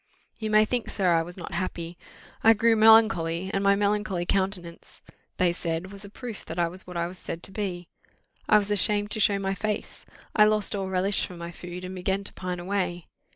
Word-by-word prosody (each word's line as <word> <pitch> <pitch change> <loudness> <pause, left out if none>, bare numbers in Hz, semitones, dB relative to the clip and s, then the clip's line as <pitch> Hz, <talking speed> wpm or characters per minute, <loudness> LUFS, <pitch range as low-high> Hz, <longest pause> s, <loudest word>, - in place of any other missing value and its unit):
"You 220 -1 -3
may 215 0 +5
think, 240 0 -2
sir, 185 -4 +2
I 165 - +3
was 175 +3 -8
not 180 +1 -8
happy. 170 -1 -4 0.5
I 225 - +8
grew 225 +2 +3
melancholy; 215 -6 +4
and 195 - 0
my 200 0 +5
melancholy 205 -3 0
countenance, 185 -3 -2 0.4
they 180 -2 +2
said, 170 +2 -3
was 200 0 -9
a 200 - -10
proof 230 0 -8
that 160 - -7
I 170 -1 +2
was 185 +3 -2
what 180 -1 -6
I 170 - 0
was 180 +1 -8
said 165 - -6
to - - -2
be. 185 -4 -4 0.6
I - - +7
was 205 0 -1
ashamed 205 0 +1
to 220 - 0
show 205 -1 +3
my 195 0 -2
face. 210 +1 -4 0.3
I 210 - +7
lost 210 -1 +1
all 195 -1 -3
relish 190 +2 +3
for 180 - -11
my 170 0 -7
food, 175 +1 -8
and 185 +1 -6
began 190 +2 -2
to - - -7
pine 180 -1 -5
away. 180 -2 -3
190 Hz, 215 wpm, -26 LUFS, 175-210 Hz, 0.6 s, I